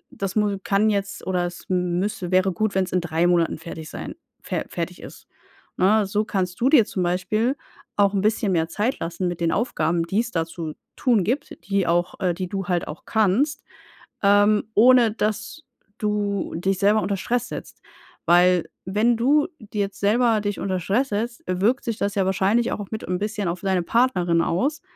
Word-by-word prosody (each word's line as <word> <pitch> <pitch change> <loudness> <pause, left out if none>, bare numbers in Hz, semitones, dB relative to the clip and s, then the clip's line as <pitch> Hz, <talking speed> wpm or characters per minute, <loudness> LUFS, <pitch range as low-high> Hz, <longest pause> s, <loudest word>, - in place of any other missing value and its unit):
das 195 0 -4
mu 210 -2 +1
kann 205 +2 +2
jetzt, 200 -1 -3
oder 180 -2 0
es 175 - -10
müsste 180 +1 -1
wäre 185 +1 +3
gut, 200 +3 -1
wenn's 190 -1 0
in 180 - +1
3 165 0 0
Monaten 175 -2 +2
fertig 160 -1 -8
sein - - -7 0.3
fe - - -2
fertig - - -5
ist“, - - -12 0.5
ne? 210 +3 +4
So 205 +2 0
kannst 185 -1 -2
du 260 - +4
dir 260 -8 +6
zum 185 - -4
Beispiel 190 +8 0 0.4
auch 200 0 +3
'n 195 - +1
bisschen 215 0 +1
mehr 165 -2 +1
Zeit 215 +6 -1
lassen 170 +2 -3
mit 175 -1 -4
den 165 -1 +2
Aufgaben, 170 -7 0
die 195 +5 0
es 235 - -5
da 165 -5 0
zu 165 -2 -7 0.2
tun 230 -7 +2
gibt, 250 +9 -2
die 195 -3 +1
auch 175 +1 0
äh, 185 -3 +1
die 185 0 -4
du 195 -2 -3
halt 175 -2 0
auch 150 - -8
kannst, 230 +8 +1 0.6
ähm, 205 +1 +4
ohne 240 -1 +6
dass 215 +7 -3 0.4
du 205 -2 -1
dich 190 +3 0
selber 210 +1 +4
unter 200 - -1
Stress 240 +5 -1
setzt. - - -8 0.5
Weil 175 0 +4 0.2
wenn 215 +5 +2
du 285 +6 +3 0.3
jetzt 200 -1 -2
selber 225 +2 +3
dich 205 -1 -2
unter 185 -2 -1
Stress 220 +10 0
setzt, 230 +3 -3
wirkt 200 +8 +1
sich 230 -1 -3
das 200 0 -1
ja 195 -2 +2
wahrscheinlich 195 +5 +1
auch 205 - -4
mit 220 - -5
'n 180 0 -1
bisschen 210 -1 -2
auf 170 +1 -3
deine 190 -2 0
Partnerin 180 -8 +2
aus. 280 - -1
200 Hz, 190 wpm, -23 LUFS, 180-220 Hz, 0.6 s, dir